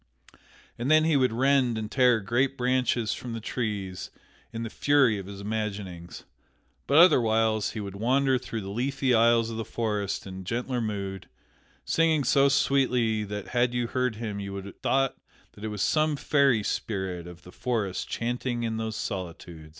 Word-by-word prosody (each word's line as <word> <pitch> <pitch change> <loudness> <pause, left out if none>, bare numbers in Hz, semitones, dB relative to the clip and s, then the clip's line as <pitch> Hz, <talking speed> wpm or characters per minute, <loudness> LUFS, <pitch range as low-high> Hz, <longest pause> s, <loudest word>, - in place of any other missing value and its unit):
And 120 +3 -2
then 155 0 +6
he 160 -1 +2
would 130 -3 +3
rend 130 -1 +2
and 110 -1 -5
tear 125 -4 +4
great 130 +7 0
branches 125 -2 +1
from 120 -2 -6
the 115 - -4
trees 105 -5 -4 0.4
in 115 0 -5
the 115 - -4
fury 135 -7 +3
of 95 - -8
his 100 0 -8
imaginings. 100 -5 -5 0.6
But 140 - +3
otherwhiles 110 - +4
he 110 - -5
would 100 -2 -6
wander 130 +4 +2
through 115 -1 -5
the 95 0 -6
leafy 130 +3 0
aisles 115 0 +4
of 110 - -5
the 115 - -2
forest 105 -4 -2
in 95 -1 -8
gentler 120 +5 -2
mood, 100 -4 -4 0.6
singing 160 -3 +2
so 140 +1 +4
sweetly 125 -5 +2
that 105 0 -6
had 120 0 +1
you 120 0 0
heard 125 -1 -1
him 105 -2 -5
you 100 -1 -5
would 100 0 -6
have 100 - -11
thought 135 0 +1 0.3
that 100 - -14
it - - -2
was 105 -2 -2
some 155 -1 +2
fairy 140 -6 +2
spirit 95 -5 -3
of 90 -1 -12
the 90 - -13
forest 110 -5 -2
chanting 120 0 -2
in 110 -1 -2
those 110 -1 -3
solitudes. 85 -5 -6
115 Hz, 175 wpm, -27 LUFS, 100-130 Hz, 0.6 s, then